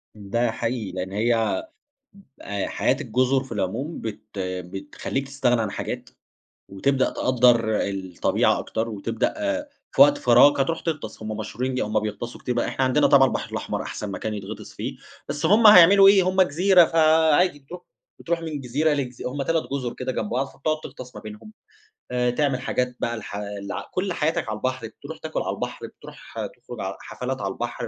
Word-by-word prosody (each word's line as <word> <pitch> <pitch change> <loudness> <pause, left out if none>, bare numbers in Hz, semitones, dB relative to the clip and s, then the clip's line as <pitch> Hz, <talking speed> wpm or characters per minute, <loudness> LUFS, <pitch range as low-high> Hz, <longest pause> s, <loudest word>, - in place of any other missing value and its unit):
ده 110 +3 -1
حقيقي، 115 -4 -3
لأن 95 +1 -5
هي 115 - +1 0.8
آآ 100 -1 -3
حياة - - +1
الجُزُر 130 +1 +1
في 135 - -15
العموم 115 - -3
بت 110 -2 -5 0.2
بتخلّيك 95 +8 -4
تستغنى 125 -4 +1
عن 105 -2 -2
حاجات - - -5 0.6
وتبدأ 130 +7 +1
آآ - - -7
تقدّر 120 -4 +3
الطبيعة 95 -3 0
أكتر، 115 +1 -3
وتبدأ 110 +1 -2 0.6
في - - +7
وقت 290 0 +5
فراغك 145 - +5
هترُوح 165 +4 0
تغطَس، 145 -10 -4
هُم 110 0 -4
مشهورين 125 +4 -3
هُم 105 0 0
بيغطَسوا 110 +3 -5
كتير 125 - -2
بقى، 120 - 0
إحنا 130 - 0
عندنا 130 +3 +3
طبعًا 135 -1 +6
البحر - - -4
الأحمر - - -3
أحسن 105 - -5
مكان 105 +2 -4
يتغطِس 105 +1 -8
فيه، - - -5 0.3
بس 145 +2 -1
هُم 220 +4 +6
هيعملوا 195 0 +9
إيه، 195 -1 +6
هُم 185 +1 +3
جزيرة، 180 +2 +5
فعادي 160 0 +3
بترُوح 175 +6 -11 0.4
بترُوح 170 0 -2
من 155 -3 -5
جزيرة 145 +5 +1
لجزي 130 -4 -3
هُم 140 +2 -3
3 165 +3 +1
جُزُر 125 -4 -2
كده 130 0 -3
جنب 105 - -3
بعض، 130 +3 0
فبتقعُد 155 +3 -2
تغطَس 130 -2 -10
ما - - -8
بينهم 110 - -10 0.6
آآ، 125 0 +1
تعمل 135 0 0
حاجات 125 -1 -1
بقى 120 0 -1
الح 105 -2 -7
ال 100 -1 -6 0.2
كلّ 185 -1 -1
حياتك 155 -8 -1
على 110 - -3
البحر، 130 -1 -3
بترُوح 110 - -10
تاكُل - - -4
على - - -2
البحر، - - -5
بترُوح - - -14
تخرُج - - -9
ع - - -4
حفلات 130 -1 -5
على 95 -1 -2
البحر، 120 -1 -4
125 Hz, 175 wpm, -24 LUFS, 110-150 Hz, 0.8 s, هيعملوا